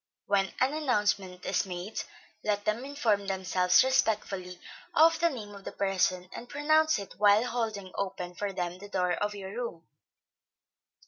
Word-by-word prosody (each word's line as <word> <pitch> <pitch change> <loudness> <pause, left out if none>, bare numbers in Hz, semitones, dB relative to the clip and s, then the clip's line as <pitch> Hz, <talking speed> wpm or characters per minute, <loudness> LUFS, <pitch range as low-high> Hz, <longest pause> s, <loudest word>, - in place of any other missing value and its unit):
When 195 -1 +1
an 260 +3 +2
announcement 205 -10 0
is - - 0
made, 180 +3 -4 0.4
let 205 -1 0
them 215 +4 0
inform 225 -8 0
themselves 185 0 +3
respectfully 210 -8 0 0.4
of 325 +1 +6
the 340 0 +4
name 215 -8 -7
of 200 -1 -11
the - - -6
person, 185 -2 0
and 245 - -8
pronounce 310 +2 +3
it 200 -1 -7
while 210 +2 +5
holding 220 -6 -3
open 185 -2 -4
for 200 +3 -3
them 180 -1 -3
the 205 +1 -10
door 180 -2 0
of 205 +3 -2
your 195 -1 -7
room. 225 -7 -5
205 Hz, 155 wpm, -29 LUFS, 185-240 Hz, 0.4 s, of